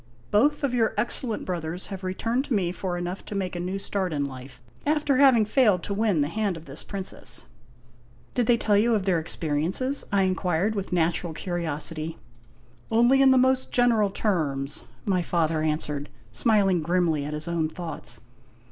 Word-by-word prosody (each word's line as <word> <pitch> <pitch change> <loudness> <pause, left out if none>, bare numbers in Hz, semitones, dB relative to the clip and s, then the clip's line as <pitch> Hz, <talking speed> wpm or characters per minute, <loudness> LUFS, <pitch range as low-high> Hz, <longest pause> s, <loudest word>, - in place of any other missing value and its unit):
Both 290 +8 +3
of 270 -3 +1
your 230 -3 +1
excellent 230 +1 -1
brothers 175 0 -3
have 190 0 -7
re 185 0 -2
turned 240 +6 0
to 260 - 0
me 180 -4 +1
for 180 -1 -3
enough 175 +2 -4
to 210 - -6
make 185 -2 -2
a - - -3
new 180 +2 -2
start 195 -3 -1
in 145 -1 0
life, 130 -1 -9 0.2
after 295 -2 +2
having 260 -5 +6
failed 210 -6 +3
to 200 - -3
win 205 -6 +2
the 145 - +1
hand 200 +1 -1
of 165 - -11
this 140 +2 -6
princess." 195 -2 -5 0.4
" 120 0 -30
Did 245 -3 +1
they 240 - +5
tell 210 -2 +2
you 225 +3 +4
of 200 -3 -1
their 180 -4 +2
experiences? 170 - -1
" - - -23
I 200 -1 +3
inquired 185 +1 +1
with 200 -2 -3
natu 175 0 +1
ral 165 - -4
curiosity. 165 -1 -3 0.4
" - - -31 0.3
Only 240 +4 +5
in 270 - +7
the 260 - +6
most 260 0 +3
general 230 -4 +3
terms," 150 -9 -1 0.2
my 185 -3 +2
father 165 -2 0
answered, 150 -2 -2 0.2
smiling 200 -6 +3
grimly 165 -2 +1
at 150 +1 -4
his 150 +1 -3
own 165 -2 0
thoughts. 155 -9 -6
185 Hz, 190 wpm, -26 LUFS, 160-220 Hz, 0.4 s, in